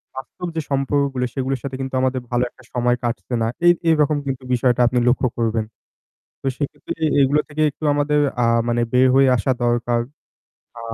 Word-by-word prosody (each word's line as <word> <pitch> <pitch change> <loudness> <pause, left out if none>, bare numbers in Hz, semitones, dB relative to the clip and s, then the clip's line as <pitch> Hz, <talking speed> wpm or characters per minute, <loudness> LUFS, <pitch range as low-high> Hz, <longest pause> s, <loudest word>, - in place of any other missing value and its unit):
বাস্তব 155 +7 -7
যে 160 - 0
সম্পর্কগুলো 135 -1 0
সেগুলোর 135 0 -2
সাথে 135 -2 -5
কিন্তু 135 0 -5
আমাদের 130 0 0
ভালো 120 0 +1
একটা - - -21
সময় 120 0 +2
কাটছে 120 +1 -3
না। 115 - +1 0.2
এ - - +7 0.2
এরকম 150 -2 +3
কিন্তু 135 -1 -3
বিষয়টা 125 0 +2
আপনি 125 +1 +1
লক্ষ্য 125 +1 +3
করবেন। 115 -1 0 0.8
তো - - -4
সেক্ষেত্রে 145 - -4 0.3
এগুলো 140 +2 +3
থেকে 150 +1 -4
একটু 150 - -15
আমাদের 145 +1 +1 0.2
আ - - +3 0.2
মানে 120 0 +1
বের 130 +1 +5
হয়ে 135 0 +5
আসা 115 +5 0
দরকার। 120 0 +1 0.8
আ - - -8
130 Hz, 175 wpm, -21 LUFS, 120-140 Hz, 0.8 s, এ